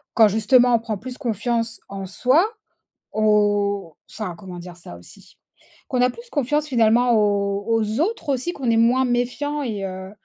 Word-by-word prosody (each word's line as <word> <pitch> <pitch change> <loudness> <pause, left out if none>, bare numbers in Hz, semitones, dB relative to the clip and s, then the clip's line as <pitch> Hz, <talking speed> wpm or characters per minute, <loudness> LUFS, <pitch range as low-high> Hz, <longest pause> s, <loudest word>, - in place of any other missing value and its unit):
quand 220 -2 +7
justement, 240 +4 +4
on 230 - +2
prend 220 -2 -4
plus 255 +4 -8
confiance 230 -1 -2
en 195 -1 -6
soi, 255 - +3 0.7
au 205 -4 +1
enfin, 210 -6 -5
comment 180 -1 -9
dire 175 0 -10
ça 170 - -11
aussi? 90 - -16 0.5
Qu'on 250 -1 0
a 250 - +4
plus 475 - -13
confiance 295 +1 0
finalement 240 0 +3
aux 200 -2 +1
aux 225 +1 0
autres 335 -4 -1
aussi, 270 +6 -1
qu'on 265 -8 -2
est 230 - +3
moins 245 +3 +3
méfiant 250 +5 -1
et 210 -6 -3
heu, 190 0 -6
230 Hz, 170 wpm, -22 LUFS, 200-255 Hz, 0.7 s, quand